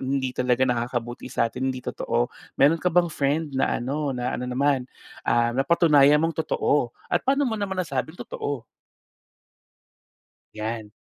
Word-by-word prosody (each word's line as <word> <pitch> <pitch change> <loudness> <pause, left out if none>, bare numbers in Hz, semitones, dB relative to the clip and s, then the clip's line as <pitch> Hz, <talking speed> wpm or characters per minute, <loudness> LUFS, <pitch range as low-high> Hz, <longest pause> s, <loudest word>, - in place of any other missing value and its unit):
hindi 130 -1 -1
talaga 125 0 +2
nakakabuti 120 0 -2
sa 115 - +1
atin, 130 +3 -2
hindi 130 - -4
totoo. 120 +1 -1 0.3
Meron 155 +4 +5
ka 180 - +2
bang 175 0 +4
friend 145 +3 +1
na 135 +1 +1
ano 140 +3 -2
na 125 +1 -2
ano 125 - -3
naman, 135 +1 +1 0.4
ah, 120 0 +2
napatunayan 150 0 +5
mong 165 0 0
totoo? 140 -5 +1 0.2
At - - 0
paano 275 +2 +2
mo 225 - -1
naman 200 -3 -3
nasabing 175 -1 -3
totoo? 140 -5 -4 1.9
'Yan. 110 0 -4
135 Hz, 145 wpm, -25 LUFS, 125-160 Hz, 1.9 s, Meron